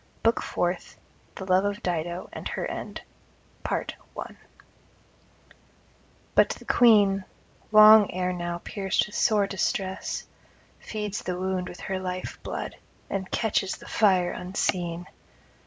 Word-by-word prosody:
BOOK 230 +1 +3
FOURTH 175 0 -2 0.4
THE 190 - -6
LOVE 185 0 +3
OF 205 +3 -2
DIDO, 175 0 -2
AND - - -5
HER - - -3
END - - -5 0.6
But - - -1 2.7
the - - -15
Queen, 205 -5 +5 0.5
long 215 -1 +9
ere 180 0 -1
now 175 -1 -4
pierced 195 -2 0
with 210 - -12
sore 210 -3 +3
distress, 190 0 -2 0.5
feeds 210 -2 -4
the 180 -1 -3
wound 185 0 -2
with 180 - -10
her 190 -1 -3
life 185 0 -5
blood, - - -5 0.3
and 190 -1 -2
catches 200 -4 0
the - - -14
fire 185 -4 +3
unseen. 180 -1 -2
190 Hz, 120 wpm, -26 LUFS, 180-205 Hz, 2.7 s, long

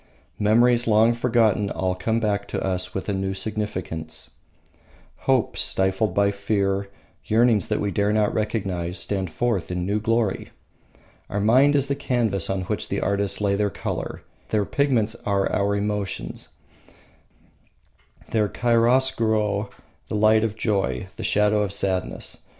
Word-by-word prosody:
Memories 120 +3 +3
long 110 +1 +5
forgotten 115 -4 +2
all 95 -1 -1
come 110 +5 -1
back 105 -3 -1
to - - -3
us 90 -1 -2
with 95 - -3
a 100 - 0
new 95 0 -2
significance. 95 -6 -4 1.0
Hopes 130 -4 +2
stifled 95 +1 +1
by 100 0 +3
fear, 100 -1 -1 0.4
yearnings 115 -1 +3
that 105 - -1
we 100 - -1
dare 100 0 +1
not 105 -1 +2
recognise, 95 -5 -2
stand 95 +1 -3
forth 115 +1 -1
in 90 0 -2
new 100 +3 0
glory. 115 -2 0 0.8
Our 100 - -2
mind 130 +8 +4
is 140 -2 +3
the 140 - 0
canvas 120 - 0
on 95 -1 -1
which - - -3
the - - -1
artists 100 0 0
lay 100 -1 +2
their 105 0 +1
colour; - - -5 0.3
their 105 -2 +1
pigments 120 -6 +1
are 100 -1 +1
our 100 0 +1
emotions; 100 -1 -3 1.8
their 105 -2 +1
chiaroscuro 115 -4 +2 0.4
the - - -4
light 110 +1 +4
of 110 -2 -1
joy, 95 - -1
the - - -7
shadow 105 0 +2
of 100 -2 -1
sadness. 95 -2 -2
105 Hz, 145 wpm, -24 LUFS, 95-110 Hz, 1.8 s, long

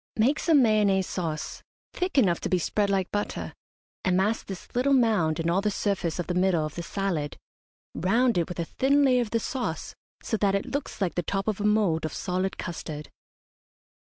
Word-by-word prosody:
Make 255 +7 +3
some 305 -6 +4
Mayonnaise 205 -4 +3
sauce, 160 -5 -4 0.3
thick 365 -3 -2
enough 185 -10 +4
to - - -3
be 185 - +3
spread 200 +4 0
like 190 -2 0
butter, 205 0 -3 0.5
and 185 -1 +2
mask 210 +4 0
this 190 -2 -7
little 265 +3 +3
mound 210 -11 +2
and 165 - -1
all 175 +3 +2
the 210 - +1
surface 195 -5 -1
of 175 - -2
the 180 - -2
middle 180 -3 +2
of 155 - -6
the 175 - -5
salad 170 -5 -2 0.6
round 230 +8 +2
it 170 - -1
with 180 - -6
a 170 - 0
thin 280 - +2
layer 250 -2 +4
of 235 - -3
the 230 - +1
sauce, 250 +2 -3 0.3
so 220 - -1
that 200 -1 +2
it 200 - -1
looks 285 -6 -4
like 185 -3 +1
the 175 - 0
top 195 +3 -2
of 215 -1 -1
a - - 0
mould 210 -6 +2
of 155 - -3
solid 185 +1 -2
custard. 155 -3 -6
195 Hz, 205 wpm, -27 LUFS, 175-225 Hz, 0.6 s, some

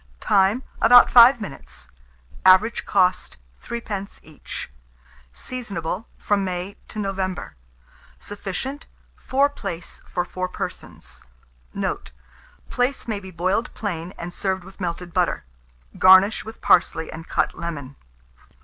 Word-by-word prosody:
Time. 200 - +2 0.2
About 245 +2 +8
5 245 +1 +8
minutes. 100 - -8 0.6
Average 190 +5 +5
cost, 185 - +1 0.3
3d. 210 -4 -5
each. 155 - -8 0.6
Seasonable 200 - -5
from 205 -1 0
May 185 +1 -4
to - - -11
November. 190 - -3 0.6
Sufficient, 210 - -6 0.3
4 275 +2 +2
plaice 195 -11 -7
for 175 - -2
4 185 0 -4
persons. 180 - -8 0.5
Note. - - -3 0.6
Plaice 250 +2 -1
may 215 -3 -2
be 190 -1 -10
boiled 185 +6 -1
plain, 180 -5 -4
and 175 +1 -7
served 190 -1 -2
with 195 +2 -14
melted 175 0 -4
butter. - - 0 0.6
Garnish 190 +3 +6
with 220 +1 -11
parsley 160 -2 +3
and 165 +1 -9
cut - - 0
lemon. 145 -6 -6
190 Hz, 115 wpm, -23 LUFS, 175-220 Hz, 0.6 s, About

